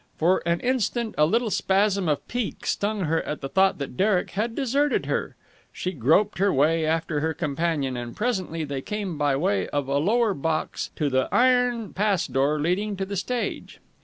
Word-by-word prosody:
For 175 +4 +3
an 170 0 +1
instant 240 -2 0
a 150 - +4
little 230 +4 +1
spasm 195 -2 +1
of 150 - -1
pique 245 -3 -4
stung 205 0 -1
her 165 -1 +1
at 150 - -5
the 135 - -3
thought 190 +6 +3
that 140 -3 -6
Derek 195 -2 +2
had 225 +3 -2
deserted 280 +2 +1
her. - - -2 0.4
She 185 - -3
groped 165 - +2
her 200 0 +3
way 155 +3 +2
after 160 -1 0
her 160 +1 -1
companion, 150 -4 -1
and 120 -1 -6
presently 190 -8 -2
they 140 -3 -4
came 205 -1 -4
by 145 -2 +2
way 190 +8 0
of 145 -2 -2
a 140 +1 +1
lower 220 +6 +2
box 155 0 -2
to 150 - 0
the 130 -1 +1
iron 245 -3 +2
pass 200 -3 +1
door 135 +4 +1
leading 195 +6 -1
to 195 - -2
the 200 +1 -5
stage. 240 +6 -3
185 Hz, 190 wpm, -25 LUFS, 150-210 Hz, 0.4 s, a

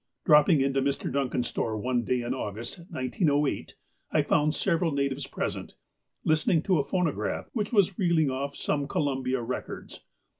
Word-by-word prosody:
Dropping 150 0 +6
into 135 0 +1
Mr. 140 -1 -1
Duncan's 130 -3 0
store 110 -1 -2
one 125 +2 0
day 125 +1 0
in 120 +1 -2
August, 115 - -5
1908, 145 0 0 0.4
I - - +3
found 150 +1 +2
several 170 -2 +1
natives 140 -1 -1
present, - - -4 0.5
listening 155 +1 +2
to 185 -5 +2
a - - +2
phonograph, 150 - -1
which 210 -4 -2
was 200 -5 +3
reeling 165 -6 +3
off 140 +2 -3
some 145 -1 -1
Columbia 130 -4 -1
rec 125 +2 -4
ords. - - -8
140 Hz, 155 wpm, -28 LUFS, 130-160 Hz, 0.5 s, Dropping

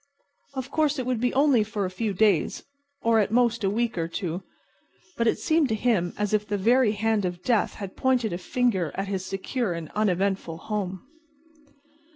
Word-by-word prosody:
Of 260 0 -5
course 305 -2 +1
it 255 - -2
would 250 -2 0
be 245 - +2
only 270 -5 +4
for 210 -2 -3
a 185 - -4
few 210 +3 -2
days, 195 -4 +2 0.4
or 230 -1 +4
at 210 - +2
most 235 0 +2
a 195 - +3
week 230 -2 -1
or 165 - -1
two, 170 +1 -4 0.7
but 235 - +1
it - - +2
seemed 315 -4 +2
to 220 - +1
him 215 -6 +1
as 210 0 -1
if 210 0 +1
the 205 - -1
very 230 +2 +3
hand 220 0 +1
of 180 -1 -3
death 235 -4 +1
had 195 -2 -7
pointed 250 -6 +1
a 175 - -3
finger 190 -5 0
at 195 0 -3
his 190 -2 -2
secure 195 +2 -2
and 165 -2 -6
uneventful 195 -4 0
home. 190 -1 -4
210 Hz, 190 wpm, -26 LUFS, 190-240 Hz, 0.7 s, only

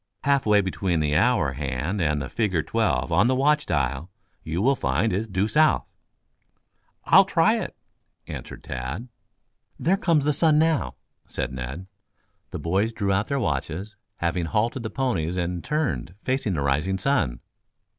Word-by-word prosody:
Half 140 -4 +2
way 105 -1 +5
between 95 -2 -1
the 75 -1 0
hour 95 - +3
hand 70 +8 -2
and 75 -2 +1
the 70 - -4
figure 95 -8 0
twelve 110 0 0
on 90 +8 +4
the 130 - +2
watch 145 +3 +2
dial 70 +4 -1 0.3
you 80 +2 -3
will 135 +7 +3
find 80 - 0
is 105 +4 -1
due 95 0 0
south." 155 +6 +3 1.2
"I'll - - +7
try - - +2
it," - - -5 0.5
answered - - -8
Tad. 65 - -5 0.7
"There 185 +4 +2
comes 165 -7 +2
the 150 - +2
sun 155 +1 +3
now," 155 - +1 0.3
said 65 - -4
Ned. 65 +8 -6 0.6
The - - -5
boys 100 +7 0
drew 100 -3 0
out 100 +2 0
their 140 -1 -1
watches, 100 - -3 0.2
having 85 0 -1
halted 115 +8 0
the 110 - -4
ponies 95 -11 -1
and 90 -1 -2
turned 95 - -2
facing 130 -7 0
the 70 - -1
rising 75 +8 0
sun. 95 - 0
95 Hz, 160 wpm, -25 LUFS, 80-125 Hz, 1.2 s, I'll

